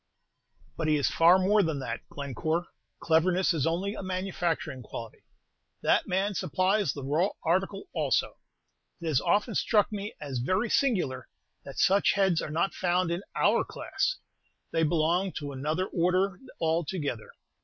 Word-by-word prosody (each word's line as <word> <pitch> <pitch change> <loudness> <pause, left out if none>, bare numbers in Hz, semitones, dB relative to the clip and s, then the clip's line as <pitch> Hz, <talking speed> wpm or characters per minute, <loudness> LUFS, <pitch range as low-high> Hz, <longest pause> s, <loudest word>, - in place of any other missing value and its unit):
"But 160 - -1
he 155 - +4
is 145 - +1
far 170 +3 +6
more 200 +3 +3
than 160 -5 -1
that, 115 -3 -4
Glencore. 145 +5 -2 0.4
Cleverness 175 +3 +3
is 160 -2 0
only 185 +5 -1
a - - -6
manufacturing 185 -7 -2
quality, 115 0 -8 0.6
that - - +3
man 195 +3 0
supplies 185 0 +1
the 140 - -7
raw 155 +8 +1
article 190 +4 0
also. - - 0 0.6
It 170 - -8
has 155 -6 +2
often 205 +6 +1
struck 210 +1 +2
me 205 0 -5
as 140 -4 -4
very 185 - 0
singular 175 - +1 0.4
that 140 - -9
such 195 +2 +4
heads 190 -5 +2
are - - -5
not 165 +5 0
found 180 -1 +1
in 170 +2 -2
our - - +3
class, - - -2 0.5
they 165 - +1
belong 170 +4 +1
to 145 -2 -5
another 155 +7 -1
order 185 +2 +1 0.2
altogether. 160 - -1
175 Hz, 150 wpm, -28 LUFS, 155-190 Hz, 0.6 s, far